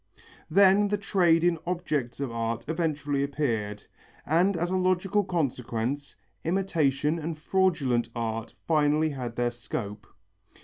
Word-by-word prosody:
Then 195 +3 +5
the 205 +1 0
trade 175 -5 +3
in 175 -2 +2
objects 150 -9 -2
of 140 -4 -2
art 115 0 -2
eventually 150 -4 -1
appeared, 115 -8 -2 0.4
and 175 +5 +2
as 175 +2 -1
a - - +1
logical 185 +2 +2
consequence, 140 - -2 0.3
imitation 160 -4 +1
and 160 0 -4
fraudulent 155 -10 +1
art 115 -1 -3
finally 155 0 +2
had 125 -4 -5
their 120 -1 0
scope. 105 -3 -6
150 Hz, 125 wpm, -27 LUFS, 120-175 Hz, 0.4 s, Then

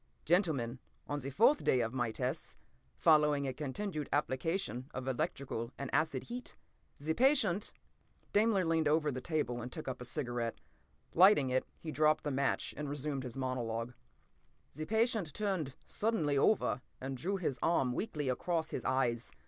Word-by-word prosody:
Gentlemen, 150 - +2 0.3
on 145 0 -2
the 135 0 -5
fourth 230 - +4
day 130 - +3
of 115 +1 -2
my 120 -3 0
tests, 130 +7 -4 0.4
following 150 -3 +4
a 130 - -2
continued 155 +4 -4
application 135 - -1
of 130 0 -4
electric 140 +1 -2 0.3
and 140 -1 -5
acid 155 +1 +1
heat, 245 +1 -7 0.4
the 155 +3 -1
patient—" 220 - +3 0.6
Daimler 205 -3 +3
leaned 165 -1 +2
over 150 0 +3
the 130 -1 -4
table 145 -6 -1
and 120 +2 -6
took 155 - -7
up 130 -1 -4
a - - -5
cigarette. 120 -4 -3 0.6
Lighting 175 -7 +6
it, 130 0 +1
he 160 - -6
dropped 155 0 +3
the 145 - -1
match 140 +1 0
and 150 -1 -4
resumed 145 -1 -2
his 125 -1 -6
monologue. 120 -2 -2 0.8
"The 155 +2 -5
patient 220 - +1
turned 185 -10 -1
suddenly 185 -10 0
over 140 - +3 0.2
and 135 +1 -4
drew 185 +10 -1
his 150 -8 -2
arm 135 -7 +2
weakly 150 - -2
across 160 +6 -1
his - - -3
eyes. 120 -3 0
145 Hz, 160 wpm, -34 LUFS, 130-170 Hz, 0.8 s, Lighting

